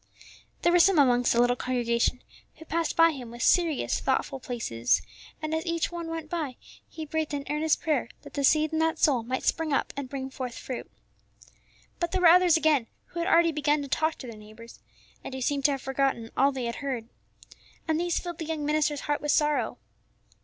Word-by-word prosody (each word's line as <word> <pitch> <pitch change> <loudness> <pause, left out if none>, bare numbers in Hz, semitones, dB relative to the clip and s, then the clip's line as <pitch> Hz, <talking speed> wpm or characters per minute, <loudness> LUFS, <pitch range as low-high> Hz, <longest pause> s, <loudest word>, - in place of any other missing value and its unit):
There 345 - +4
were 355 - +5
some 380 +1 +5
amongst 245 -4 +4
the 235 - +2
little 245 0 +4
congregation 245 0 0 0.3
who 320 - -13
passed 330 0 -1
by 330 0 +6
him 255 -6 -8
with 240 0 -6
serious, 335 -5 +2
thoughtful 270 - -1
faces, 120 - 0 0.4
and 310 0 -2
as 320 0 -1
each 335 0 -1
one 340 -1 -5
went 325 -1 -5
by 305 -6 -3 0.3
he 315 - -7
breathed 310 -1 -2
an 280 -1 -5
earnest 305 +1 +1
prayer 295 -7 0
that - - -12
the 285 - -2
seed 310 +3 +3
in 315 - +1
that 320 +1 +1
soul 270 -7 +3
might 255 +3 -3
spring 325 -2 0
up - - 0
and 280 -2 -5
bring 265 -1 -5
forth 255 -2 -6
fruit. 255 - -6 1.1
But 345 0 -2
there 375 - +1
were 345 - +8
others 355 -1 +6
again 305 -7 +2 0.2
who 340 - -6
had 340 - -1
already 335 -3 +4
begun 295 -1 +1
to - - -6
talk 315 +3 0
to 255 - -10
their 230 -2 -9
neighbors, 215 +2 -13 0.4
and 265 - -6
who 265 - -5
seemed 275 +1 -1
to 290 - +5
have 270 - -5
forgotten 270 -4 -1
all 275 +2 +4
they 260 -3 -4
had 235 - -3
heard. 255 -5 -4 0.8
And 320 0 +1
these 345 -1 0
filled 345 -2 -5
the 325 - -4
young 310 -2 -3
minister's 300 -1 +1
heart 290 0 -1
with 295 - -3
sorrow. 300 -1 +1
295 Hz, 210 wpm, -27 LUFS, 255-320 Hz, 1.1 s, were